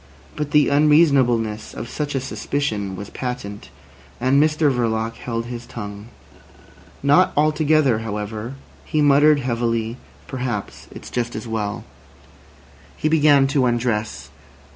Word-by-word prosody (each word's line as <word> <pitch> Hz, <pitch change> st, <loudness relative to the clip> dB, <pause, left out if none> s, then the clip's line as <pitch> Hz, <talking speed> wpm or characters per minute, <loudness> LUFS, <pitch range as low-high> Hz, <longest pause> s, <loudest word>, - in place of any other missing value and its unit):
But 150 Hz, -1 st, -3 dB
the 150 Hz, 0 st, +4 dB
unreasonableness 140 Hz, -7 st, +3 dB
of 115 Hz, -, -6 dB
such 145 Hz, +2 st, -4 dB
a -, -, +1 dB
suspicion 110 Hz, -7 st, -3 dB
was 100 Hz, +2 st, -8 dB
patent, 115 Hz, -5 st, -6 dB, 0.5 s
and 130 Hz, +3 st, +3 dB
Mr 155 Hz, -2 st, +2 dB
Verloc 115 Hz, -2 st, -1 dB
held 115 Hz, 0 st, -4 dB
his 120 Hz, 0 st, -7 dB
tongue. 105 Hz, -1 st, -8 dB, 1.0 s
Not 145 Hz, +6 st, +4 dB
altogether, 150 Hz, -4 st, +3 dB
however. 110 Hz, +2 st, -5 dB, 0.3 s
He 155 Hz, -, -2 dB
muttered 145 Hz, 0 st, +5 dB
heavily: 115 Hz, -2 st, -1 dB, 0.3 s
"Perhaps 125 Hz, -6 st, -5 dB
it's -, -, -11 dB
just 120 Hz, -1 st, -2 dB
as 110 Hz, +2 st, -6 dB
well." 110 Hz, 0 st, -3 dB, 1.1 s
He 155 Hz, -, 0 dB
began 145 Hz, -3 st, +5 dB
to 135 Hz, -2 st, +2 dB
undress. 120 Hz, -3 st, -2 dB
125 Hz, 120 wpm, -21 LUFS, 110-145 Hz, 1.1 s, muttered